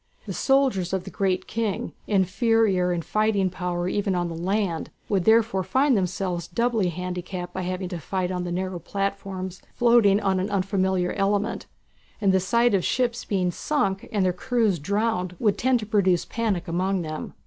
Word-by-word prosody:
The - - -5
soldiers 260 -10 +2
of 190 -1 0
the 195 - -9
"Great 190 -2 0
King," 220 -3 -2
inferior 200 -1 +2
in 170 -1 -1
fighting 200 +1 +1
power 175 -1 -2
even 195 0 0
on 175 -1 -1
the 165 - -5
land, 185 0 -1 0.2
would 195 -4 +1
therefore 220 -3 +4
find 265 +5 +2
themselves 180 -2 -1
doubly 230 -2 +1
handicapped 180 0 -5
by 190 - -3
having 185 +1 -3
to 175 -2 -5
fight 185 +2 -2
on 180 -1 -2
the 175 - -4
narrow 185 0 -2
platforms 195 0 -4
floating 235 -5 +5
on 195 -2 +1
an 190 +3 -1
unfamiliar 190 -2 0
element, 205 +1 0 0.5
and 200 -3 +3
the 190 - +4
sight 235 +5 +2
of 190 -3 +2
ships 240 -2 0
being 185 -3 0
sunk 195 - -1
and 200 -3 +1
their 180 - +2
crews 215 -1 +1
drowned 195 +1 -1
would 210 0 +2
tend 255 0 +3
to - - -5
produce 190 -5 +2
panic 205 -6 -2
among 185 +2 0
them. 155 -1 -6
190 Hz, 175 wpm, -25 LUFS, 180-215 Hz, 0.5 s, floating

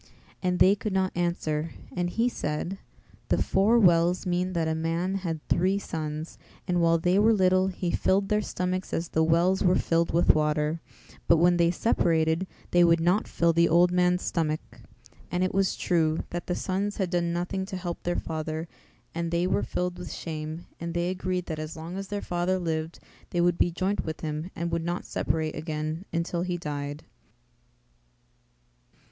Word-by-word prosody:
And 180 -1 0
they 190 - +6
could 205 0 -3
not 190 -1 +1
answer 165 -2 -1 0.2
and 175 -1 0
he 230 +6 +1
said, 175 -2 -3 0.5
"The - - +2
four 205 +5 +3
wells 175 -3 +4
mean 180 +1 0
that 165 -2 0
a 160 - +1
man 165 +3 -1
had 165 -4 -4
three 185 +3 +2
sons, 155 -4 -5 0.3
and 175 -2 +1
while 165 0 +4
they 180 +4 +2
were 220 +2 +5
little 185 -1 +3
he 180 -2 -2
filled 195 +1 +2
their 210 +1 +2
stomachs 185 -1 -3
as 165 0 -2
the 160 - +2
wells 170 +4 +3
were 180 -1 +4
filled 165 0 +1
with 170 +2 +5
water; 150 +1 0 0.5
but 170 - +6
when 175 +2 +4
they 170 -1 +4
separated 165 -2 +1 0.2
they 175 0 +5
would 170 -1 +5
not 180 +6 +2
fill 170 0 +2
the 170 +1 +4
old 175 +2 +5
man's 180 0 +2
stomach." 155 - -2 0.5
And 180 +1 0
it 185 - 0
was 195 0 +2
true, 160 -3 +1
that 175 0 -4
the 180 - 0
sons 200 +2 -2
had 190 -3 -1
done 175 -1 +1
nothing 180 +3 -2
to 195 -2 -5
help 175 -2 -5
their 175 0 -1
father 160 +1 -3 0.5
and 170 0 -2
they 170 +1 +1
were 185 - +1
filled 180 0 -2
with 180 - -6
shame 155 0 -5
and 170 0 -5
they 175 +1 0
agreed 185 -1 -2
that 160 -2 -4
as 155 0 -5
long 165 +3 -6
as 195 0 -5
their 205 0 -4
father 175 +1 0
lived 160 -2 -3 0.3
they 175 - -2
would 175 0 +2
be - - +4
joint 185 +4 -1
with 160 -1 -5
him 155 +2 -3
and 170 +1 -3
would 165 0 -1
not 175 +1 -3
separate 160 -1 -1
again 155 +2 -4
until 170 +1 -1
he 180 0 -2
died. 145 -2 -5
175 Hz, 185 wpm, -27 LUFS, 160-185 Hz, 0.5 s, they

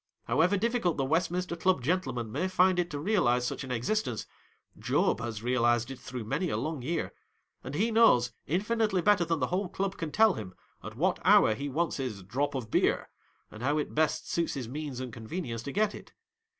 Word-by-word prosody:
However 180 +5 +2
difficult 230 -5 0
the 135 - 0
Westminster 175 +4 0
Chili 185 -1 +2
gentlemen 130 -6 -1
may 185 - -1
find 185 0 +3
it 175 0 0
to 145 - -4
realize 145 - +2
such - - -3
an 130 - -8
existence, 125 - -1 0.5
Job - - +1
has 115 -2 -5
realized 120 0 +2
it 135 - -8
through 125 -2 -6
many 150 - -1
a 105 - -1
long 150 +4 -3
year; 165 +7 -2 0.5
and 140 - -6
he 220 +8 +1
knows, 170 - +5 0.2
infinitely 210 +1 +1
better 205 -4 +4
than 165 -1 0
the 125 - 0
whole 185 0 0
Club 195 +1 -3
can 165 -3 -4
tell 220 +1 +5
him, 95 - -7 0.3
at - - -8
what - - +1
hour 110 - +6
he 140 +6 -4
wants 165 +4 -1
his 120 -8 -4
"drop 135 +9 -2
of 120 -5 -5
beer," - - +1 0.4
and 105 - -10
how 145 +4 +1
it 150 - -2
best 155 0 +1
suits 170 -2 -1
his 130 -4 -4
means 140 0 -5
and 130 -3 -6
convenience 115 +1 -5
to 140 - -6
get 210 +4 +1
it. - - -12
150 Hz, 200 wpm, -29 LUFS, 125-185 Hz, 0.5 s, hour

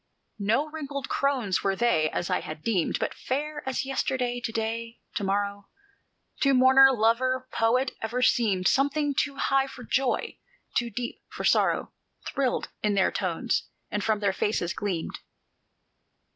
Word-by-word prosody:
No 225 +9 +1
wrinkled 285 -3 -5
crones 255 -9 +1
were 195 -1 +1
they, 190 -9 +2
as 175 - -2
I 180 - +2
had 155 0 -8
deemed, 195 -8 +1
But - - -2
fair 295 +3 -3
as 265 - -2
yesterday, 260 -2 -1
to - - -2
day, 230 +1 -3 0.2
to 205 - -2
morrow, 200 0 -1 0.7
To 275 -1 +4
mourner, 265 +1 +7
lover, 255 +2 +1
poet, 250 +4 +2
ever 240 +3 -1
seemed; 200 -8 +3
Something 285 +1 +2
too 280 +1 0
high 270 0 +2
for 250 - -10
joy, 260 +2 -1 0.4
too 240 -1 +1
deep 240 +2 -5
for - - -7
sorrow, - - +2 0.3
Thrilled 265 -3 -1
in 210 -1 +1
their 190 - +3
tones, 190 +5 -1 0.2
and 210 - -1
from 215 -1 +1
their 200 -2 +2
faces 190 -3 -1
gleamed. 190 -6 -3
235 Hz, 150 wpm, -27 LUFS, 205-270 Hz, 0.7 s, mourner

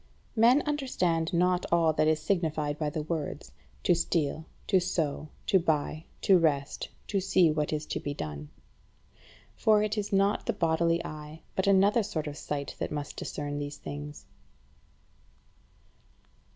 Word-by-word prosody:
15. 220 - -1
Men 245 +5 +6
understand 185 - 0
not 180 +1 +2
all 165 -2 +4
that 155 - +2
is 155 0 +3
signified 155 -4 -1
by 155 -2 0
the 150 +1 -3
words 155 -2 -4 0.3
to - - +4
steal, 160 -2 -1 0.2
to 190 - +4
sow, 155 -4 -2 0.2
to 190 - +4
buy, 155 -1 -1 0.2
to 190 -2 +5
rest, 145 -4 0 0.2
to 200 - 0
see 185 -3 +4
what 150 -1 -1
is 155 0 -2
to - - -3
be 145 - -4
done. 75 - -6 1.1
For 215 -1 +4
it 215 0 -1
is 205 - -4
not 200 +1 +2
the 235 - +2
bodily 170 -2 +1
eye 155 +1 -8
but 190 - 0
another 200 +3 +5
sort 185 -7 -3
of 150 -1 -5
sight 145 -1 -4
that - - -3
must 150 -1 -4
discern 145 0 -4
these 145 0 -5
things. 145 - -7
160 Hz, 155 wpm, -29 LUFS, 150-190 Hz, 1.1 s, Men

